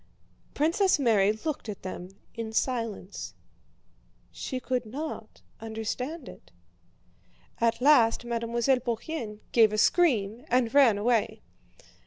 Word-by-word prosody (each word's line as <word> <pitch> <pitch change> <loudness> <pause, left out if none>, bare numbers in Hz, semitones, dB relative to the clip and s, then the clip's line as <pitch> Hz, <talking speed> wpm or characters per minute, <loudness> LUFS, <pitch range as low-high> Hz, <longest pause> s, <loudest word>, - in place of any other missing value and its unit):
Princess 340 +6 +2
Mary 215 -7 +3
looked 245 +2 -5
at 205 - -7
them 185 -1 -6 0.2
in 230 -1 -5
silence. 215 - -3 1.0
She 260 - -5
could 255 -1 -2
not 285 +8 -7 0.2
understand 225 +7 -5
it. - - -13 1.1
At 230 +1 +1
last 245 -5 +4
Mademoiselle 235 +2 0
Bourienne 235 -2 -4
gave 225 -3 +5
a 215 - -2
scream 230 - +2
and 245 -1 +2
ran 265 -7 +6
away. 230 +1 0
235 Hz, 110 wpm, -28 LUFS, 220-260 Hz, 1.1 s, ran